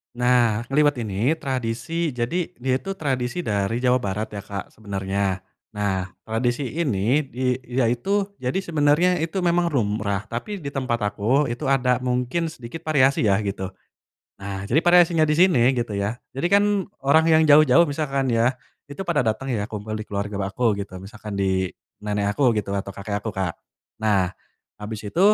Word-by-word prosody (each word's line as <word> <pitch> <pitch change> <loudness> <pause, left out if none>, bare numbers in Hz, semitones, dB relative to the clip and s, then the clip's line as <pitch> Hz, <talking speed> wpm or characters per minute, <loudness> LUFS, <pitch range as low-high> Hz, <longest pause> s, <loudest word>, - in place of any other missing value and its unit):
Nah 120 -2 +2
ngeliwet 145 0 +2
ini 105 +8 +1
tradisi 135 +6 -2
jadi 125 +9 -2
dia 130 +1 +1
itu 195 +9 -4
tradisi 130 +1 -1
dari 105 - -1
Jawa 125 0 +3
Barat 105 -3 -2
ya 100 - -5
Kak 100 -1 -6
sebenernya, 100 -2 -2 0.3
nah 100 -3 -1 0.2
tradisi 120 +4 0
ini 135 - +1 0.4
dia 125 -1 0
itu 195 - 0
jadi 130 +5 -2
sebenernya 170 0 +2
itu 165 +4 -2
memang 175 -1 +2
lumrah 105 -5 -1
tapi 155 - -5
di 145 - -7
tempat 130 -4 -2 0.2
aku 130 +8 +2
itu 120 +5 -4
ada 130 -2 +2
mungkin 125 +7 -1
sedikit 130 +3 -9
variasi 140 -4 +3
ya 100 -2 +3
gitu, 100 -2 -3 0.7
nah 100 0 -5
jadi 120 +10 +2
variasinya 175 -2 +5
di 150 - +2
sini 135 -8 +4
gitu 120 -3 -2
ya 100 +3 -2 0.2
jadi 135 +6 -1
kan 205 - +4 0.4
orang 160 +4 +5
yang 160 0 +5
jauh-jauh 150 +1 +6
misalkan 140 -4 -1
ya, 120 +3 +2 0.3
itu 145 +7 -6
pada 170 -4 +1
dateng 125 +3 -1
ya 105 -2 -2
kumpul 105 0 -6
di 110 0 -5
keluarga 100 0 -3
aku 115 +3 +1
gitu 100 -2 -5
misalkan 105 -1 -7
di, 95 -1 +1 0.3
nenek 105 -1 -1
aku 125 -3 +2
gitu 100 -1 -2
atau 100 0 -2
kakek 100 0 -3
aku 110 - -5
Kak, 95 -5 -3 0.4
nah, 100 -4 +2 0.5
habis 105 0 -6
itu 105 - -2
120 Hz, 165 wpm, -23 LUFS, 105-145 Hz, 0.7 s, jauh-jauh